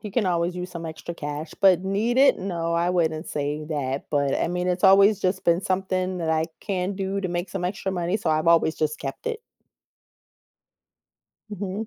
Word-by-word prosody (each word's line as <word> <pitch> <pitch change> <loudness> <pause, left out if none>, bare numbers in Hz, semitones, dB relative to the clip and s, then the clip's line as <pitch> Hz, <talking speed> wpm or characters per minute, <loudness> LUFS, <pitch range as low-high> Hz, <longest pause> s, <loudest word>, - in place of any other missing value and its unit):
you 210 - -7
can 225 +2 +1
always 175 -1 0
use 180 0 -5
some 170 -2 -6
extra 160 +2 -7
cash. 150 0 -5
But 190 -2 +5
need 210 +5 0
it? 275 +1 +5
No, 170 -3 -2
I 170 +1 +1
wouldn't 165 -2 0
say 150 +1 -3
that, 140 -3 -3
but, 140 -2 +1
I - - 0
mean, 180 +1 -2
it's 180 0 -1
always 195 +1 +6
just 190 0 -1
been 170 +1 +3
something 185 -1 -1
that 165 -2 -1
I 160 0 +1
can 190 -1 -2
do 195 0 -2
to 190 - -2
make 175 +1 -3
some 180 -2 -2
extra 190 +1 -3
money, 175 +1 -1
so 175 -6 -1
I've 155 +1 +1
always 165 -1 +4
just 155 0 -1
kept 135 - -6
it. 465 -1 -2 2.1
Mhm. 205 +1 -4
180 Hz, 195 wpm, -24 LUFS, 160-195 Hz, 2.1 s, always